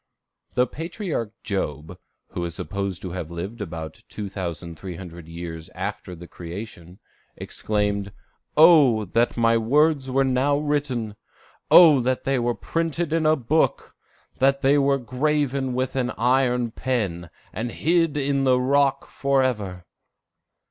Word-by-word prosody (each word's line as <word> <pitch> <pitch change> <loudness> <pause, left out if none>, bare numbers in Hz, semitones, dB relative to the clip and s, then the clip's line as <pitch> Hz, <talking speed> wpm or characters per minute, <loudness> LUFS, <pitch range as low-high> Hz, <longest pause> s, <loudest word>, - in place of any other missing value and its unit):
] - - -47
The 125 0 +4
patriarch 165 - -4
Job, 85 -3 -4 0.3
who 85 - -4
is 85 -1 -4
supposed 95 +1 -4
to 90 - -5
have 90 -3 -5
lived 95 +7 -6
about 80 -5 -6
2,300 90 -3 -7
years 85 -1 -7
after 95 0 -5
the 85 +1 -11
creation, 90 0 -9 0.4
exclaimed, 105 -1 -2 0.5
"O 150 -9 +6
that 115 +7 +1
my 115 0 +3
words 140 +3 +2
were 135 +1 +2
now 135 +2 +2
written! 145 -7 -2 0.5
O 155 -7 +8
that 130 +1 -1
they 135 -1 +1
were 120 0 0
printed 165 -1 -2
in 165 -1 +2
a 155 - +5
book! 150 +4 0 0.5
that 135 +1 +3
they 140 +1 +4
were 140 0 +3
graven 135 0 -1
with 130 +1 -2
an 125 -2 0
iron 125 -1 +2
pen, 100 -10 -2 0.2
and 115 +4 -3
hid 165 +1 +1
in 140 -1 0
the 130 -1 +4
rock 140 +1 +2
forever!" 125 -10 -1
120 Hz, 135 wpm, -24 LUFS, 95-140 Hz, 0.5 s, O